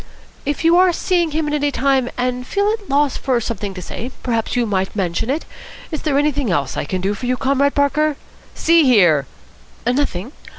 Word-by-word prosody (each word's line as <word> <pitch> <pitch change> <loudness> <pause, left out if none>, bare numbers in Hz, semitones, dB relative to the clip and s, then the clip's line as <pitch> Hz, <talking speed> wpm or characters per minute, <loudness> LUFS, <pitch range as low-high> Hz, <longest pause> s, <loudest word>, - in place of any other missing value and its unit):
"If 290 +3 -2
you 335 +1 +6
are 365 0 +5
seeing 345 -1 +1
him 310 0 -1
at 295 - -2
any 290 -1 +1
time 265 -2 +1
and 250 0 -2
feel 405 +1 +1
at 435 -3 -5
a - - -19
loss 285 -1 +2
for 255 -3 0
something 210 -4 -4
to 180 - -7
say, 240 - -6
perhaps 230 -1 -1
you 245 -1 +2
might 190 -2 -1
mention 185 +2 -1
it. 295 +5 -1 0.5
Is 310 - -3
there 290 -3 0
anything 290 -4 +1
else 145 -7 -1
I - - -2
can 185 +4 -3
do 195 +2 0
for 235 +4 -5
you, 250 0 +1
Comrade 275 +2 +1
Parker?" 290 +1 +2 0.4
"See 335 0 +4
here 175 - +4 0.3
" - - -28
"Nothing? 245 -4 -1
265 Hz, 210 wpm, -19 LUFS, 215-300 Hz, 0.5 s, you